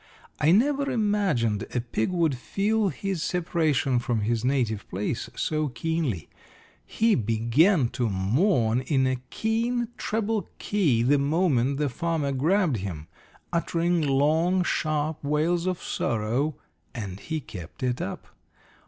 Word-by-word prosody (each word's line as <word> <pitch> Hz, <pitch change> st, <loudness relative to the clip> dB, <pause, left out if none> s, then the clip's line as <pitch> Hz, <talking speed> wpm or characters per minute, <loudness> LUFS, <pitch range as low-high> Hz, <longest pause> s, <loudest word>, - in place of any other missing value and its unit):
I 150 Hz, -, +3 dB
never 280 Hz, +7 st, +3 dB
imagined 200 Hz, -, +1 dB
a -, -, +2 dB
pig 115 Hz, -2 st, -1 dB
would 170 Hz, -6 st, +1 dB
feel 205 Hz, -, 0 dB
his 195 Hz, -2 st, -3 dB
separation 160 Hz, -8 st, +1 dB
from 120 Hz, -2 st, -1 dB
his 115 Hz, +2 st, 0 dB
native 125 Hz, -6 st, 0 dB
place 105 Hz, +5 st, -3 dB
so 155 Hz, -1 st, 0 dB
keenly. 145 Hz, -, -2 dB, 0.6 s
He 225 Hz, -, +1 dB
began 120 Hz, -, +3 dB
to 125 Hz, -2 st, -1 dB
mourn 115 Hz, -, +2 dB
in 135 Hz, 0 st, +1 dB
a 130 Hz, -1 st, -1 dB
keen 230 Hz, +2 st, -1 dB
treble 220 Hz, -1 st, -1 dB
key 155 Hz, -, +1 dB
the 140 Hz, +3 st, +4 dB
moment 140 Hz, -3 st, +2 dB
the 150 Hz, 0 st, +1 dB
farmer 160 Hz, +1 st, -1 dB
grabbed 155 Hz, -, +2 dB
him, 90 Hz, -6 st, -6 dB, 0.4 s
uttering 170 Hz, 0 st, +1 dB
long, 155 Hz, +6 st, +2 dB
sharp 155 Hz, -2 st, -1 dB
wails 160 Hz, +5 st, +1 dB
of 185 Hz, -2 st, -2 dB
sorrow, 120 Hz, +6 st, -1 dB, 0.4 s
and 100 Hz, -5 st, -5 dB
he 160 Hz, +6 st, -3 dB
kept 95 Hz, -, -9 dB
it 125 Hz, -1 st, 0 dB
up. 100 Hz, -, -5 dB
150 Hz, 130 wpm, -26 LUFS, 120-180 Hz, 0.6 s, the